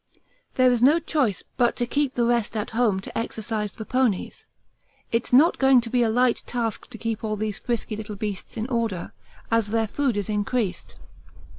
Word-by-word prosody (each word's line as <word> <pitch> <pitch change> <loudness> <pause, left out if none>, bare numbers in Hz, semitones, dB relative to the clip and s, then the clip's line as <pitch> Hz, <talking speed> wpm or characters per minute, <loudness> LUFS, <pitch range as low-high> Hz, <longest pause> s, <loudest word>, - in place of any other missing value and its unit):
There 255 -1 +5
is 240 -2 +1
no 285 +6 +6
choice 280 - 0
but 240 -2 +3
to 240 - 0
keep 280 +2 -1
the 240 - +2
rest 235 -2 +1
at 210 - -3
home 225 -5 +1
to - - -10
exercise 220 -2 -3
the 220 - -7
ponies. 255 -7 -1 0.6
It's 230 0 -1
not 295 +8 +5
going 265 -1 +6
to 230 -1 -7
be 250 - +2
a 230 - +3
light 245 +2 +2
task 230 -3 -3
to 240 - -9
keep 225 -1 -3
all 215 -1 -1
these 210 -1 -3
frisky 235 -2 -2
little 210 -1 -6
beasts 205 0 -5
in 220 - -2
order, 230 -8 -2 0.4
as 230 -2 +2
their 225 +1 +1
food 260 -1 0
is 205 - -2
increased. 210 -2 -2
230 Hz, 190 wpm, -24 LUFS, 215-245 Hz, 0.6 s, no